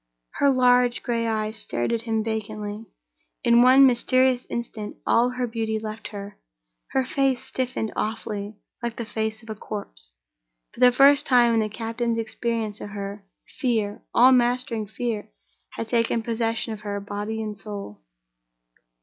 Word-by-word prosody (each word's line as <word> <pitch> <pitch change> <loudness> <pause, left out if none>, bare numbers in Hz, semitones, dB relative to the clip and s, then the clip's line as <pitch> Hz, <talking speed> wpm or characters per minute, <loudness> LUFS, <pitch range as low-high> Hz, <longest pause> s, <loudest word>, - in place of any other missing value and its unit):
Her 280 - +5
large 250 -2 +3
gray 230 -1 0
eyes 220 0 -1
stared 120 - -1
at 230 - 0
him 225 -1 -1
vacantly. 215 -1 -4 0.6
In 235 -1 +5
one 260 +2 +8
mysterious 255 0 +3
instant 225 -3 -5
all 240 +2 +4
her 250 0 -2
beauty 225 -2 -2
left 215 0 -6
her; 200 -1 -9 0.5
her 265 -1 0
face 265 -1 0
stiffened 255 -4 -2
awfully, 210 -1 -3 0.2
like 235 -1 -3
the 235 - -4
face 220 0 -3
of 225 - -8
a - - -2
corpse. - - -7 0.6
For - - -14
the 250 0 +7
first 280 +3 +5
time 240 -3 +5
in 225 - +3
the 215 -1 0
captain's 230 +1 -2
experience 225 -1 -3
of - - -6
her, 200 0 -6 0.4
fear—all 235 +1 +3
mastering 240 -3 +1
fear—had 200 - -6
taken 230 0 +1
possession 225 0 -1
of 210 - -8
her, 205 -1 -3
body 205 +2 -4
and 215 -1 -4
soul. 200 - -8
225 Hz, 150 wpm, -24 LUFS, 210-245 Hz, 0.6 s, one